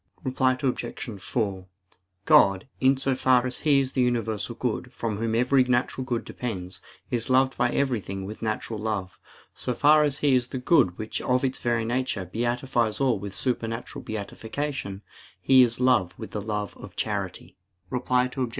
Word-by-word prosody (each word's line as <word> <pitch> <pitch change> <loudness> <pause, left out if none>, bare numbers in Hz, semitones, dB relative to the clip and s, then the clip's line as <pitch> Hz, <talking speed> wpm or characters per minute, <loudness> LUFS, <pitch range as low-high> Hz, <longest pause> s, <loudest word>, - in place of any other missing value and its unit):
Reply 130 0 +1
Obj. 120 -5 -3
4: 100 -5 -2 0.6
God, 95 +2 +5
in 135 +1 +4
so 135 0 0
far 130 -1 +3
as 125 0 -4
He 145 -3 +4
is 135 -1 -1
the 130 - +1
universal 120 -2 -1
good, 125 +1 -3
from 115 -4 -3
Whom 115 +1 -1
every 130 +3 +4
natural 125 +1 0
good 120 -3 -2
depends, 95 -7 -5 0.3
is 120 +1 -1
loved 130 +1 +3
by 120 - +2
everything 105 -8 -1
with 105 +2 -8
natural 110 0 -3
love. 105 -4 -3 0.3
So 125 - -3
far 150 +3 +6
as 145 -2 +1
He 145 -3 +2
is 125 -1 +2
the 130 - -5
good 125 - +3
which 110 0 -4
of 125 +1 +1
its 130 - -2
very 120 -2 0
nature 120 -5 -1
beatifies 120 - -1
all 130 -6 +2
with 100 0 -6
supernatural 115 -2 -2
beatitude, 110 0 -4 0.4
He 130 -1 +6
is 120 -1 +2
love 125 -9 +2
with - - -8
the 105 - -3
love 105 -1 -3
of - - -11
charity. - - -3 0.4
Reply 125 0 +1
Obj. 130 -3 -1
120 Hz, 170 wpm, -26 LUFS, 110-130 Hz, 0.6 s, far